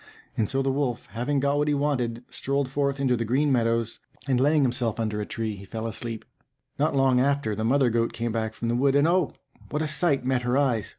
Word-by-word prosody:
And 105 - 0
so 135 0 0
the 135 - +1
wolf, 135 -3 -1
having 125 +7 -1
got 140 +1 +1
what 150 - +1
he 145 - +2
wanted, 125 -5 -1
strolled 140 0 -2
forth 140 0 -1
into 130 -2 +2
the 115 - -1
green 135 +6 +1
meadows, 115 -2 0 0.3
and 130 -2 +2
laying 145 +2 +4
himself 120 -3 0
down 115 - -2
under 105 -1 -2
a 105 - -5
tree, 110 -2 -3
he 100 - -11
fell 110 +3 -6
asleep. 115 0 -3 0.5
Not 150 0 +1
long 135 -2 +4
after, 140 -4 +1
the 110 +2 -3
mother 130 +1 +3
goat 115 0 +1
came 115 0 -3
back 110 -1 -2
from 115 - -4
the 120 - +1
wood; 135 +2 +2
and, 145 +2 +4
oh! 175 -2 +2 0.4
what 150 +1 -1
a - - -1
sight 150 -3 +1
met 130 -1 +1
her 125 +2 0
eyes! 125 -7 +1
130 Hz, 240 wpm, -26 LUFS, 115-140 Hz, 0.5 s, laying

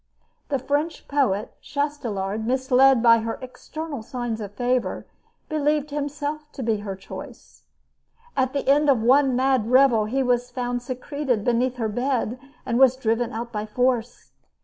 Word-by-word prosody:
The 280 - +1
French 290 +5 -2
poet, 245 -7 0
Chastelard, 225 -8 -3
misled 260 0 +4
by 230 -1 +7
her 225 0 -3
external 285 +2 -7
signs 240 -1 -4
of 205 -1 -7
favor, 250 +1 -1 0.4
believed 300 -1 0
himself 295 +1 -4
to 265 - -5
be 225 -2 +1
her 205 -2 -5
choice. 190 - -11 0.7
At 260 0 +1
the 280 - -2
end 290 +2 +4
of 245 -5 +3
one 265 +2 +4
mad 260 -3 +2
revel 250 -4 +5
he 265 +5 0
was 245 -1 +1
found 245 -1 -3
secreted 255 -1 -2
beneath 245 +2 +1
her 230 -3 -1
bed, 245 +1 -1 0.3
and 240 -1 0
was 260 -1 +6
driven 230 -1 0
out 235 +1 -5
by 210 -1 -4
force. 245 +1 -1
250 Hz, 150 wpm, -24 LUFS, 230-275 Hz, 0.7 s, by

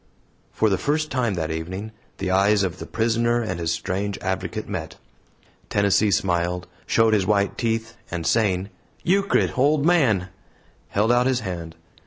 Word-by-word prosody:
For 110 -1 +1
the 95 - +1
first 155 +1 0
time 120 -6 0
that 80 -2 -2
evening 95 +7 -5 0.3
the 95 -1 -2
eyes 100 +2 +4
of 95 -1 -3
the - - -7
prisoner 115 +1 +1
and 90 -5 -3
his 85 -1 -1
strange 100 +4 -2
advocate 95 -1 -3
met. - - -5 0.7
Tennessee 100 +1 +3
smiled, 90 -2 0 0.2
showed 115 -1 +3
his 100 -3 +2
white 100 -1 +2
teeth, 115 -1 -2
and, 85 -2 -4
saying, 100 -4 +1 0.3
"Euchred, 195 +3 +2
old 145 +2 +3
man!" 120 - +3 0.6
held 105 +4 +1
out 125 +1 +3
his 130 -2 +1
hand. 85 -5 -5
100 Hz, 155 wpm, -23 LUFS, 90-115 Hz, 0.7 s, eyes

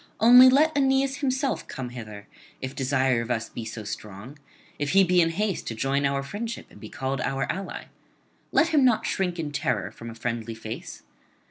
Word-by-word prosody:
Only 245 +3 +9
let 305 +4 +4
Aeneas 270 0 +2
himself 270 -1 -1
come 130 -2 -6
hither, 110 -4 -9 0.3
if 130 0 -5
desire 130 -2 +1
of 115 - -6
us 115 -2 -2
be 120 - -7
so 110 0 -6
strong, 105 +6 -8 0.4
if 145 +2 -1
he 195 0 +7
be 180 -1 +4
in 165 - +3
haste 200 +3 -2
to 115 - -3
join 140 +4 +1
our 140 0 -1
friendship 220 +10 -5
and - - -15
be 110 - -9
called 135 0 -3
our 135 0 -1
ally. 195 +1 -6 0.7
Let 330 - +3
him 300 -4 +3
not 230 -3 +3
shrink 180 -3 -1
in 155 -3 -3
terror 145 - -1
from 115 - -10
a 115 - -9
friendly 115 -1 -4
face. 110 0 -8
140 Hz, 195 wpm, -26 LUFS, -, 0.7 s, Only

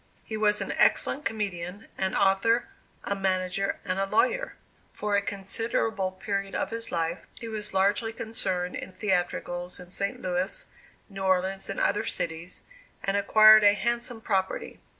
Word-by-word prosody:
He 220 - -6
was 210 -1 +2
an - - -2
excellent 290 - +3
comedian, 200 -3 -3
an 190 0 -1
author, 200 +5 +3 0.3
a 200 - -1
manager 190 0 0
and 185 +1 -1
a 195 - +1
lawyer. - - +1 0.4
For 210 -1 -1
a 200 - +3
considerable 200 0 -1
period 195 0 -3
of - - -1
his 230 0 -3
life, 165 +1 -1 0.2
he 230 - -6
was 215 -2 -3
largely 205 +4 +2
concerned 185 -6 -2
in 190 - -6
theatricals 180 -2 -2
in 180 0 -11
St. 200 +1 -2
Louis, 180 +1 -1 0.4
New 195 -2 -8
Orleans 190 +1 +1
and 195 - -3
other 205 - +1
cities, 165 +2 -4 0.4
and 195 0 0
acquired 215 +1 +7
a 205 0 +7
handsome 235 +2 -2
property. 190 -4 -2
195 Hz, 150 wpm, -27 LUFS, 185-215 Hz, 0.4 s, acquired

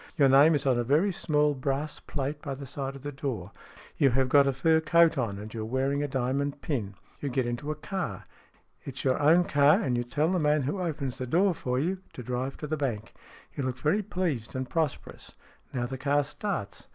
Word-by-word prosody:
Your 140 -3 +5
name 145 +4 +6
is 145 - 0
on 130 -3 +3
a - - +1
very 155 - +3
small 150 -3 +1
brass 140 +2 -2
plate 145 +1 -4
by 140 -2 -4
the 140 +1 -8
side 135 0 -5
of 135 - -11
the 145 - -4
door. 125 -9 -4 0.5
You 140 - +5
have 130 +1 +1
got 140 0 +6
a - - +3
fur 160 +5 +3
coat 170 +1 +4
on, 115 -7 -2
and 105 +2 -8
you 115 - -4
are - - -3
wearing 135 +4 0
a 145 - 0
diamond 135 +2 -1
pin. 105 -10 -2 0.2
You 145 - -3
get 130 -1 0
into 120 +5 -3
a 155 - -1
car. 190 +4 -4 0.6
It 135 - -7
is - - -4
your 130 +1 +1
own 165 +5 +6
car, 145 -2 +4
and 125 -3 0
you 120 - 0
tell 150 +7 0
the 185 - +1
man 150 -2 +2
who 150 +8 -2
opens 140 -7 -3
the 130 - -3
door 180 +8 +3
for 125 -5 -2
you 180 +8 0
to 125 - -8
drive 125 +2 -3
to - - -6
the 155 +1 -2
bank. 115 -7 -3 0.4
You - - -3
look 130 -1 -2
very 155 +10 +1
pleased 175 - -3
and 130 0 -2
pros 160 -2 0
perous. - - -13 0.4
Now 120 -2 -2
the 130 +1 -6
car 145 +1 +2
starts. 140 - -5
140 Hz, 235 wpm, -28 LUFS, 130-150 Hz, 0.6 s, name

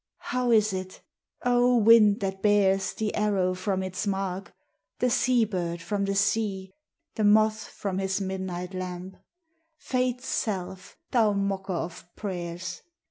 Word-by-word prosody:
How 250 -1 0
is 215 -3 +4
it? 185 0 -6 0.4
O 245 0 +4
wind 215 -2 +6
that 195 -1 -3
bears 195 -2 +3
The 215 -1 -2
arrow 200 -4 +1
from 190 +1 -2
its 185 +2 -4
mark, 195 -1 -3 0.5
The 250 -1 +1
sea 245 -2 +3
bird 175 -4 -3
from 200 +4 -2
the 195 0 -1
sea, 200 -2 0 0.4
The 220 - -2
moth 215 +1 +4
from 195 -2 -4
his 195 0 -1
midnight 190 -1 -4
lamp, 185 0 -6 0.6
Fate's 255 -2 -1
self, 190 -3 -3
thou 220 -4 +3
mocker 195 -1 -2
of 170 0 -4
prayers! 175 -3 -5
195 Hz, 135 wpm, -27 LUFS, 185-215 Hz, 0.6 s, wind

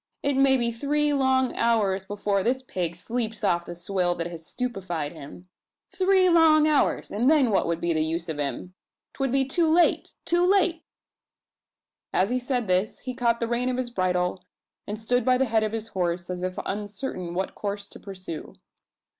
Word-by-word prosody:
It 280 -1 +1
maybe 265 -3 +3
three 290 +5 0
long 260 -2 +2
hours 205 -5 +1
before 205 0 -1
this 255 +5 0
pig 175 -8 -3
sleeps 225 +3 -3
off 170 0 +1
the 175 - -6
swill 175 0 -1
that 170 - -3
has 170 -1 -7
stupefied 185 - -3
him. 165 +3 -11 0.4
Three 375 0 +3
long 320 -3 +5
hours, 300 -2 +1
and 235 +6 +2
then 290 -7 +4
what 195 - +2
would 170 0 -1
be 170 0 0
the 155 -1 +1
use 165 +2 -2
of 155 -3 -4
him? 145 +5 -4 0.4
'Twould 270 -2 -1
be 270 0 +2
too 320 +4 +1
late 340 +1 +2
too 345 +1 +2
late!" 360 -3 +3 1.3
As 195 +5 +1
he 255 - +1
said 245 -1 -1
this, 185 +2 0
he 255 - -5
caught 235 -1 +1
the 230 - -1
rein 240 +2 0
of 250 - -1
his 250 -2 -3
bridle, 180 -3 -1 0.4
and 210 +1 -4
stood 245 +2 +1
by 255 +1 +3
the 265 - +2
head 225 -2 +1
of 215 -1 -1
his 225 0 -5
horse, 175 -2 -2
as 180 0 -5
if 185 0 -3
uncertain 200 -3 -4
what 190 +1 -2
course 200 0 -4
to - - -12
pursue. 185 -5 -8
220 Hz, 190 wpm, -25 LUFS, 180-260 Hz, 1.3 s, long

